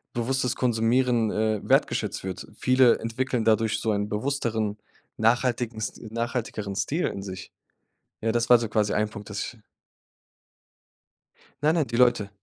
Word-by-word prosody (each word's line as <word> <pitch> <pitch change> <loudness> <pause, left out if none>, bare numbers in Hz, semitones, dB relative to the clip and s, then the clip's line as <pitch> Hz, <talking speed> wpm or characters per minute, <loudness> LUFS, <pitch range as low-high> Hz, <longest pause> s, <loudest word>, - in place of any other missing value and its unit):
bewusstes 125 +1 0
Konsumieren, 120 -1 +2
äh, 110 -1 0
wertgeschätzt - - +1
wird. 95 -2 -6
Viele 130 -1 +4
entwickeln 115 0 -2
dadurch 110 0 +2
so 110 - -2
ein 105 0 -1
bewussteren, 110 -3 -1 0.4
nachhaltigenst 120 -1 0
nachhaltigeren 115 -4 -3
Stil 140 - 0
in 95 - -5
sich. 95 -1 -8 0.7
Ja, 115 0 +1
das 120 0 0
war 120 - +9
so 115 -1 -3
quasi 105 -1 0
ein 105 0 +1
Punkt, 105 0 -10
dass 100 - -4
ich 120 - -5 2.1
Nein, 155 +2 +4
nein, 155 -5 +1
die 115 - -4
Leute. 120 -5 +3
115 Hz, 140 wpm, -26 LUFS, 105-125 Hz, 2.1 s, war